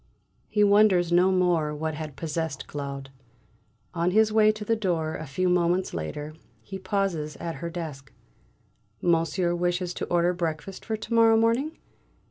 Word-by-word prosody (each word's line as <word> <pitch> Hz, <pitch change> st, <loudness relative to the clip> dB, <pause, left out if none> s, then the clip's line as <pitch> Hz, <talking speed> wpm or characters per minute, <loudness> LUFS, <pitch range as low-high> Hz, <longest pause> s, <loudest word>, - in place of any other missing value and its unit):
He 210 Hz, -1 st, +2 dB
wonders 200 Hz, -4 st, +4 dB
no 180 Hz, +2 st, +4 dB
more 175 Hz, -5 st, +1 dB
what 155 Hz, +1 st, -3 dB
had 150 Hz, -2 st, -6 dB
possessed 160 Hz, -2 st, -3 dB
Claude. 140 Hz, -2 st, -6 dB, 0.8 s
On 170 Hz, 0 st, +1 dB
his 215 Hz, +3 st, +3 dB
way 215 Hz, -1 st, +5 dB
to 215 Hz, 0 st, -7 dB
the 225 Hz, -, +2 dB
door 170 Hz, -7 st, -1 dB
a 155 Hz, -, -6 dB
few 185 Hz, +7 st, -1 dB
moments 180 Hz, +1 st, +1 dB
later, 145 Hz, -, -5 dB, 0.3 s
he 195 Hz, -1 st, -7 dB
pauses 185 Hz, -6 st, -2 dB
at 165 Hz, -1 st, -5 dB
her 170 Hz, -, -3 dB
desk. 155 Hz, -6 st, -7 dB, 0.9 s
"Monsieur 170 Hz, +1 st, +1 dB
wishes 175 Hz, 0 st, -1 dB
to -, -, -4 dB
order 175 Hz, +1 st, +2 dB
breakfast 170 Hz, +1 st, -4 dB
for 220 Hz, -1 st, -2 dB
to 215 Hz, +2 st, -6 dB
morrow 225 Hz, -1 st, +6 dB
morning?" 235 Hz, +8 st, +1 dB
175 Hz, 155 wpm, -26 LUFS, 160-200 Hz, 0.9 s, morrow